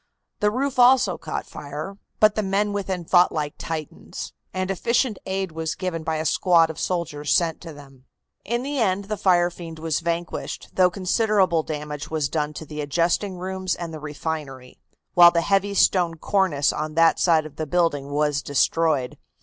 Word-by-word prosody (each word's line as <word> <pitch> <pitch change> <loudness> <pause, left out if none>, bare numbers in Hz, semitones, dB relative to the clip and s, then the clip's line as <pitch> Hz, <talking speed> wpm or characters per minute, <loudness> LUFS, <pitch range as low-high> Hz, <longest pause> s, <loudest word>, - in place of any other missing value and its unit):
The 210 - +3
roof 260 +3 -2
also 245 -7 +5
caught 155 - -4
fire, 150 +7 -7 0.2
but 215 -1 +5
the 215 - -1
men 205 +1 0
within 190 -3 -3
fought 175 +1 +4
like 150 -2 -3
Titans, 155 -2 -6 0.2
and 185 0 -2
efficient 235 +3 0
aid 190 -1 -2
was 160 0 -3
given 180 -3 -3
by 160 0 -1
a 155 0 -2
squad 165 0 +3
of 160 - -10
soldiers 165 -5 -2
sent 165 -2 +1
to 165 - -8
them. 135 -3 -15 0.4
In 240 +3 -2
the 285 0 -3
end 200 -3 +1
the 215 +2 -3
fire 175 -3 +3
fiend 165 -2 -9
was 160 -1 -1
vanquished, 170 0 -4
though 185 -1 +4
considerable 190 -1 +1
damage 150 -1 -6
was 155 -3 -1
done 150 -2 -1
to 160 - -8
the 150 0 -6
adjusting 170 +6 0
rooms 185 0 -3
and 170 -2 -6
the 155 - -6
refinery, 145 -4 -6 0.3
while 175 -1 +9
the 170 -1 +1
heavy 200 +2 +1
stone 175 -4 +3
cornice 165 -5 +1
on 155 0 -4
that 165 0 +4
side 160 -3 +3
of 150 -1 -11
the 155 - -3
building 145 -4 0
was 145 0 0
destroyed. 145 -1 +1
170 Hz, 180 wpm, -23 LUFS, 155-190 Hz, 0.4 s, while